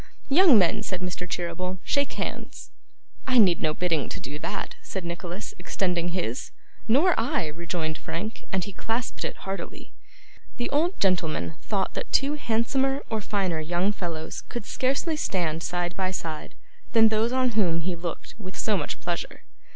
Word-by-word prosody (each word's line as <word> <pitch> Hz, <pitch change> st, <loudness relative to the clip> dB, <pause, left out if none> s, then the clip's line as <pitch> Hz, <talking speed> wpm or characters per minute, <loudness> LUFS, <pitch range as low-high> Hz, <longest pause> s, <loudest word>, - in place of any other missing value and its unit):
'Young 305 Hz, -, +8 dB
men,' 190 Hz, +2 st, +4 dB
said 185 Hz, -4 st, -3 dB
Mr. 180 Hz, 0 st, -3 dB
Cheeryble, 180 Hz, +2 st, -2 dB
'shake 280 Hz, -1 st, +1 dB
hands!' -, -, -5 dB, 0.6 s
'I 255 Hz, -1 st, +4 dB
need 190 Hz, -7 st, +6 dB
no 155 Hz, -, +3 dB
bidding 165 Hz, -6 st, +1 dB
to -, -, -4 dB
do 145 Hz, +3 st, -6 dB
that,' -, -, -3 dB
said 190 Hz, -3 st, -5 dB
Nicholas, 175 Hz, +2 st, -5 dB
extending 175 Hz, -1 st, 0 dB
his. 170 Hz, -9 st, -2 dB, 0.4 s
'Nor 295 Hz, +11 st, +5 dB
I,' 230 Hz, -, +1 dB
rejoined 160 Hz, 0 st, -3 dB
Frank, 210 Hz, +7 st, -4 dB
as 190 Hz, -2 st, +1 dB
he 200 Hz, -, -7 dB
clasped 230 Hz, +5 st, -2 dB
it -, -, -2 dB
heartily. 195 Hz, 0 st, -5 dB, 0.7 s
The 240 Hz, -, -2 dB
old 330 Hz, +6 st, +2 dB
gentleman 170 Hz, -4 st, +1 dB
thought 195 Hz, -3 st, -1 dB
that -, -, -4 dB
two 280 Hz, +2 st, +4 dB
handsomer 270 Hz, +1 st, +1 dB
or 220 Hz, -1 st, 0 dB
finer 190 Hz, -5 st, 0 dB
young 175 Hz, +5 st, +1 dB
fellows 165 Hz, -5 st, -4 dB
could 240 Hz, -3 st, -4 dB
scarcely 275 Hz, +8 st, 0 dB
stand 170 Hz, -, 0 dB
side 175 Hz, 0 st, -1 dB
by 190 Hz, -1 st, 0 dB
side 165 Hz, -4 st, -4 dB, 0.4 s
than 225 Hz, -1 st, +7 dB
those 220 Hz, +2 st, +2 dB
on 255 Hz, 0 st, +3 dB
whom 180 Hz, -7 st, +2 dB
he 180 Hz, +2 st, -1 dB
looked 170 Hz, 0 st, -5 dB
with 190 Hz, -3 st, -8 dB
so 215 Hz, -, +2 dB
much 155 Hz, -6 st, -2 dB
pleasure. -, -, -3 dB
185 Hz, 165 wpm, -27 LUFS, 170-225 Hz, 0.7 s, Young